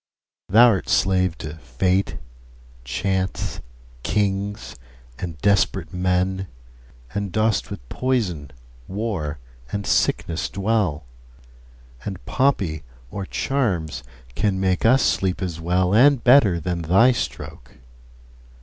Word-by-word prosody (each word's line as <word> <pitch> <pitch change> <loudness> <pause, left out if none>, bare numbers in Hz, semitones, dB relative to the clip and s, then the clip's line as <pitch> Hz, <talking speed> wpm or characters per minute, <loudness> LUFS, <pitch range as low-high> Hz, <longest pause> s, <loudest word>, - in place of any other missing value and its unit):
Thou'rt 110 -1 +5
slave 95 -2 +2
to 75 0 -7
fate, 90 +5 -1 0.7
chance, 95 +9 -2 0.4
kings, 100 - -2 0.4
and 85 -3 -5
desperate 100 -3 +1
men, 90 +1 0 0.7
And 100 -2 -3
dost 110 -1 +1
with - - -8
poison, 95 - -1 0.4
war, 95 -7 -3 0.3
and 100 -1 -3
sickness 80 -1 0
dwell; 100 - 0 0.9
10 - - -11
And 90 - -17
poppy 100 - +1 0.3
or 100 -2 -5
charms 85 - -1 0.3
can 100 - 0
make 95 +2 +1
us 130 +3 +5
sleep 95 -2 +1
as 85 -4 -4
well 90 +2 +1
And 130 +3 +5
better 120 -9 +5
than 85 +1 -3
thy 95 +10 +5
stroke. 60 - -6
95 Hz, 105 wpm, -22 LUFS, 85-105 Hz, 0.9 s, Thou'rt